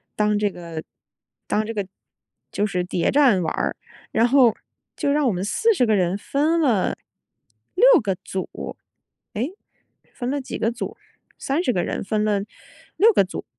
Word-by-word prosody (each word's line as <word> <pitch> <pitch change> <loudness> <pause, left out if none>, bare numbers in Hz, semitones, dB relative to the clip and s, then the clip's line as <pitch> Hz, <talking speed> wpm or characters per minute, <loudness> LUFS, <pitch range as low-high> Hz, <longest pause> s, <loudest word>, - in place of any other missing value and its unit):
当 210 -1 +2
这 205 -1 +1
个 170 -3 -7 0.6
当 215 0 0
这 225 - -4
个， 205 -2 -2 0.7
就 205 - +1
是 180 -3 -1
谍 180 -1 0
战 255 -11 +4
玩 - - -1
儿。 - - -1 0.4
然 225 - +3
后 245 -2 +5 0.4
就 285 -2 0
让 295 -2 +2
我 - - +3
们 180 +1 -3
40 385 - +2
个 215 -2 +3
人 180 +1 +1
分 310 +9 +1
了， 230 -10 +1 0.8
6 430 - +5 0.2
个 195 -4 -1
组， 190 -1 -6 1.3
诶， - - -34
分 245 - -5
了 285 - -1
几 260 - -6
个 225 - 0
组？ 235 - -6 0.4
30 280 0 0
个 180 - 0
人 - - -3
分 210 +1 -1
了 205 -2 +1 0.6
6 445 +3 +6
个 - - +4
组。 185 - -7
215 Hz, 160 characters per minute, -23 LUFS, 195-275 Hz, 1.3 s, 6